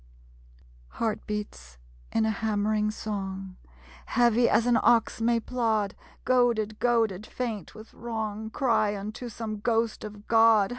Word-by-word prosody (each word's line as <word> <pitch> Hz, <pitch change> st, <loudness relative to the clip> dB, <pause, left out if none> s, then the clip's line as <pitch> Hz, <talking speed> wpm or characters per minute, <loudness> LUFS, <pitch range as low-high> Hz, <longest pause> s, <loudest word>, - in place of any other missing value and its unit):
Heart 220 Hz, -, -3 dB
beats, 65 Hz, -, -6 dB, 0.3 s
in 225 Hz, -, +2 dB
a 220 Hz, -, +2 dB
hammering 215 Hz, 0 st, 0 dB
song, 195 Hz, -3 st, -5 dB, 0.5 s
Heavy 240 Hz, 0 st, +3 dB
as 225 Hz, +2 st, +3 dB
an 245 Hz, -1 st, +4 dB
ox 230 Hz, -1 st, +3 dB
may 235 Hz, 0 st, +3 dB
plod, 220 Hz, -4 st, 0 dB, 0.3 s
Goaded 235 Hz, -4 st, +2 dB
goaded 225 Hz, -4 st, +1 dB
faint 225 Hz, -8 st, -5 dB
with 220 Hz, 0 st, -12 dB
wrong, 220 Hz, -2 st, -4 dB
Cry 220 Hz, -4 st, +1 dB
unto 215 Hz, +5 st, -6 dB
some 215 Hz, -1 st, -5 dB
ghost 225 Hz, 0 st, 0 dB
of 210 Hz, 0 st, -9 dB
God 225 Hz, -3 st, +5 dB
220 Hz, 130 wpm, -27 LUFS, 210-230 Hz, 0.5 s, God